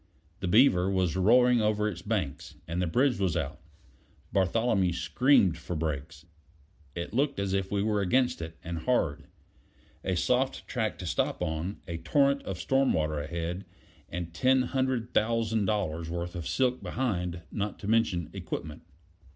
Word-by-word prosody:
The 95 - -3
Beaver 95 -3 +5
was 95 -3 +1
roaring 120 +5 +5
over 105 0 +1
its 90 -5 -4
banks, 95 -9 -3
and 85 +2 -2
the 90 - 0
bridge 125 +7 +2
was 90 -4 +1
out. 75 -5 -3 0.7
Bartholomew 95 -1 +2
screamed 85 - +3
for 85 +2 -5
brakes: 80 0 -4 0.7
it 85 +3 -5
looked 140 +1 +1
as 100 -1 -1
if 95 -1 -1
we 100 -1 +1
were 105 -1 +1
against 125 +3 +2
it 80 0 -7
and 85 0 -4
hard. 80 - 0 0.8
A - - 0
soft - - 0
track - - -2
to - - -7
stop - - -1
on; 85 +4 -3
a 85 -1 -4
torrent 140 - +2
of 95 - -4
storm 135 +9 +2
water 75 -1 0
ahead, 85 +4 -4 0.5
and 85 -1 -5
ten 130 +7 +3
hundred 130 -2 -1
thousand 115 -1 +1
dollars' 85 -5 -1
worth 85 +1 -4
of 85 -3 -5
silk 130 -1 +1
behind, 90 -9 -2
not 105 0 -3
to 100 - -7
mention 105 -7 +1
equipment. 75 -2 -6
95 Hz, 160 wpm, -29 LUFS, 85-115 Hz, 0.8 s, Beaver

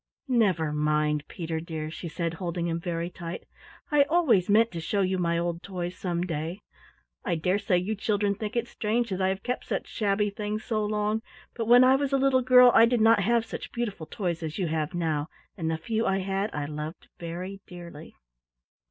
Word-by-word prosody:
"Never 190 - +2
mind, 150 0 +1
Peter, 165 -2 -4
dear," 160 -1 -5
she 170 - -6
said, 165 0 -3
holding 170 0 -3
him 170 -1 -1
very 170 0 -3
tight, 170 -1 -7 0.5
"I 295 -1 +5
always 285 - +3
meant 225 +3 +4
to 170 - -5
show 200 +5 0
you 185 0 0
my 170 -1 +1
old 170 0 -2
toys 180 -2 -5
some 175 -2 -2
day. 165 +2 -4 0.6
I 175 - 0
dare 180 +5 +1
say 190 -3 +2
you 185 +5 -1
children 205 -1 0
think 210 +3 -5
it 235 - 0
strange 230 +1 -1
that 190 0 -2
I 190 - +3
have 190 +1 -2
kept 250 +1 -3
such - - -2
shabby 205 -1 0
things 210 +1 -4
so 220 -3 -1
long, 210 +1 0 0.3
but 230 -2 -3
when 245 +2 +8
I 260 +1 +6
was 280 0 -1
a - - +5
little 270 -1 +3
girl 250 0 +7
I 230 - +7
did 240 0 +1
not 225 0 +5
have 230 +3 +2
such - - -7
beautiful 210 -9 -4
toys 175 -5 -3
as 155 -1 -4
you 180 -5 -1
have 155 0 -2
now, 160 -3 -1 0.3
and 165 -4 -2
the 160 - 0
few 225 +6 -1
I 195 - +2
had 195 +2 -1
I 145 -1 -3
loved 150 +2 -6
very 180 +4 -6
dearly." 170 -3 -10
190 Hz, 205 wpm, -27 LUFS, 165-220 Hz, 0.6 s, when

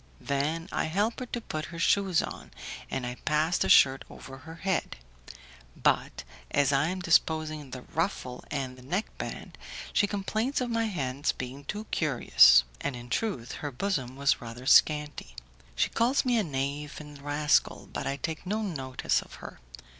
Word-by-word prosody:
Then 150 +5 -1
I - - 0
help 205 +8 0
her 255 - -5
to 240 - -3
put 155 -7 -4
her 170 - -9
shoes 190 0 +3
on, - - -7 0.4
and 130 - -3
I 125 0 -5
pass 155 +3 +2
the - - +1
shirt 135 0 +6
over 135 0 -11
her 160 +5 -10
head, 190 - -2 0.8
but 65 - +1 0.3
as 140 0 +2
I 140 +3 +3
am 185 +2 -3
disposing 155 -4 +1
the 130 -1 -8
ruffle 160 -7 -3
and 130 -3 -4
the - - -13
neck 180 - -3
band, - - -6 0.3
she 205 - +3
complains 215 +7 -1
of 250 -2 -2
my 230 0 +1
hands 140 -8 -1
being 130 +2 -7
too 210 +8 -4
curious; 140 - +6 0.2
and 140 - -3
in 120 0 -10
truth, 185 - -2
her 145 - -2
bosom 130 -4 -2
was 140 0 +2
rather 120 +2 -8
scanty. 150 - +3 0.4
She - - +2
calls 245 +5 +2
me 245 -2 +3
a - - +1
knave 145 -1 -3
and 150 -2 -11
rascal, 145 +1 +1
but - - -3
I 135 - -1
take 160 +3 -4
no 210 +4 -2
notice 135 -10 -1
of - - -13
her. - - -10
150 Hz, 175 wpm, -28 LUFS, 135-190 Hz, 0.8 s, shirt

